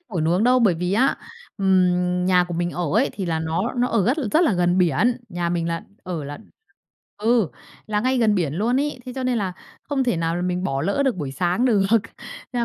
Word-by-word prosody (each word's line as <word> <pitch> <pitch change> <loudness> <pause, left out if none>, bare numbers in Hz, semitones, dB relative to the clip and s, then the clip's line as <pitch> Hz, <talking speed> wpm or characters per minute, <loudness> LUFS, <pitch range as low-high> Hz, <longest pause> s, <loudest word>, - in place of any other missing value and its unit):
ngủ 185 -8 -3
nướng 175 +6 +2
đâu, 250 +1 +5
bởi 210 -8 +3
vì 180 +3 -2
á, 255 +6 +2 0.4
ừm, 180 -2 +2
nhà 180 -1 +4
của 175 -1 -6
mình 175 +1 -1
ở 175 - -4
ấy 230 +6 +3
thì 190 -3 -4
là 160 -1 -1
nó 165 +8 -1
nó 250 +1 +2
ở 205 -5 +1
rất 260 +5 +2 0.2
rất 320 +3 +4
là 285 - +3
gần 180 0 +2
biển. 185 - +2
Nhà 175 -2 -2
mình 170 -1 -1
là 165 0 -3 0.2
ở 170 -5 -5
là 145 +1 -7 0.8
ừ, 225 -4 +2 0.4
là 210 -1 0
ngay 255 +2 +1
gần 220 -3 +3
biển 165 -7 0
luôn 240 +8 +1
ấy, 295 -3 -2
thế 250 - -5
cho 265 - -4
nên 250 -2 +1
là 190 -3 -2 0.3
không 275 -2 -1
thể 240 -8 +1
nào 165 0 -1
là 175 - -2
mình 180 0 -2
bỏ 135 -5 -1
lỡ 200 +11 +1
được 255 -7 +1
buổi 140 -5 -4
sáng 180 - 0
được, 210 -6 +3 0.7
nên 245 - -1
là - - +2
185 Hz, 240 wpm, -22 LUFS, 175-235 Hz, 0.8 s, đâu